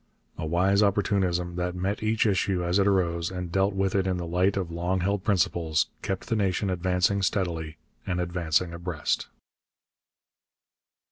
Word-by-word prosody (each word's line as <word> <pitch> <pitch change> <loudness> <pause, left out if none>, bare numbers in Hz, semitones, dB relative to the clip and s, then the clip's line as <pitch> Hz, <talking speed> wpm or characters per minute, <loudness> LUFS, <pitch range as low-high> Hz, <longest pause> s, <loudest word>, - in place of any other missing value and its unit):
A 80 - -4
wise 95 +5 +3
opportunism, 95 -4 +1
that 90 0 -2
met 95 +3 -2
each 110 +1 +1
issue 95 -3 +1
as 90 +3 +1
it 100 - +3
arose 85 -3 +1
and 90 -2 -5
dealt 95 +2 +1
with 95 0 0
it 95 -1 +1
in 90 -1 0
the 90 - -4
light 90 +4 +1
of 90 -3 -2
long 90 +2 -1
held 100 +1 0
principles, 85 -6 +1
kept 95 -2 -3
the 115 - 0
nation 100 -1 0
advancing 90 +2 +1
steadily 85 -5 -1 0.3
and 90 -1 -1
advancing 85 -1 0
abreast. 85 -2 -2
90 Hz, 155 wpm, -27 LUFS, 85-100 Hz, 0.3 s, wise